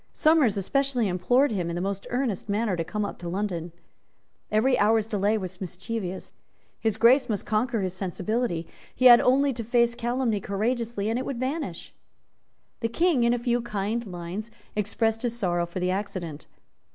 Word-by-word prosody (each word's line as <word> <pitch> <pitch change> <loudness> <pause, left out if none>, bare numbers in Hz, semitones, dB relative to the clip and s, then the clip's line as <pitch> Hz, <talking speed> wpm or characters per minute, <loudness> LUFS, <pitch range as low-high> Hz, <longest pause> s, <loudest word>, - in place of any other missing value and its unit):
Somers, 305 -10 +4
especially, 255 +3 +1
implored 245 +10 +2
him 180 -5 -1
in 170 - -3
the - - -2
most 195 +1 -3
earnest 245 -5 -2
manner 205 -1 +1
to 165 - -1
come 210 +5 -2
up - - -7
to 175 - -5
London. 175 -3 -3 0.8
Every 240 +5 +3
hour's 215 +1 +3
delay 210 0 +1
was 185 -2 -6
mischievous. 190 +1 -5 0.5
His 220 -2 0
Grace 245 +4 +5
must 210 -3 -2
conquer 220 +1 0
his 185 -2 -2
sensibility. 185 0 -2 0.3
He 255 - 0
had 240 -1 +10
only 275 +2 +3
to 230 -1 -5
face 235 +1 +2
calumny 240 -2 -1
courageously, 220 +2 -2
and 225 +3 0
it 260 - -4
would 270 -4 -3
vanish. 260 - -4 0.9
The 230 - -1
King, 320 +1 +2
in 235 - +4
a - - -1
few 240 0 0
kind 220 0 -2
lines, 180 +4 -6 0.3
expressed 220 +2 0
his 240 -1 -2
sorrow 175 -5 0
for 170 +2 -5
the 180 0 0
accident. 185 -6 -4
215 Hz, 175 wpm, -26 LUFS, 190-240 Hz, 0.9 s, had